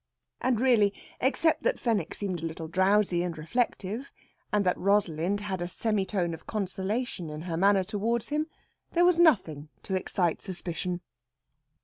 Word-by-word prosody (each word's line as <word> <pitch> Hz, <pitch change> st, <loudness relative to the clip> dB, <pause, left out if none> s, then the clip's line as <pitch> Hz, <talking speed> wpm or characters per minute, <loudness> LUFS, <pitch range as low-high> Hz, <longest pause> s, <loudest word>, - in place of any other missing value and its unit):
And, 250 Hz, -3 st, +1 dB
really, 225 Hz, -6 st, +4 dB, 0.2 s
except 310 Hz, +5 st, +2 dB
that -, -, 0 dB
Fenwick 210 Hz, -9 st, 0 dB
seemed 185 Hz, -5 st, -3 dB
a -, -, -3 dB
little 160 Hz, 0 st, -6 dB
drowsy 190 Hz, 0 st, +3 dB
and 175 Hz, -2 st, -3 dB
reflective, 220 Hz, -, -2 dB, 0.4 s
and 210 Hz, -1 st, +2 dB
that 180 Hz, -, +3 dB
Rosalind 195 Hz, -1 st, +1 dB
had 190 Hz, -3 st, -3 dB
a 175 Hz, -, -1 dB
semitone 195 Hz, -3 st, 0 dB
of 165 Hz, -, -10 dB
consolation 195 Hz, -1 st, -2 dB
in 150 Hz, 0 st, -6 dB
her 170 Hz, -2 st, -3 dB
manner 195 Hz, +2 st, +4 dB
towards 215 Hz, +4 st, -1 dB
him, 305 Hz, +1 st, 0 dB, 0.5 s
there 350 Hz, +1 st, +4 dB
was 355 Hz, -1 st, +4 dB
nothing 160 Hz, -, +3 dB
to 190 Hz, -, -4 dB
excite 185 Hz, -2 st, 0 dB
suspicion. 180 Hz, -1 st, -3 dB
195 Hz, 150 wpm, -28 LUFS, 175-225 Hz, 0.5 s, really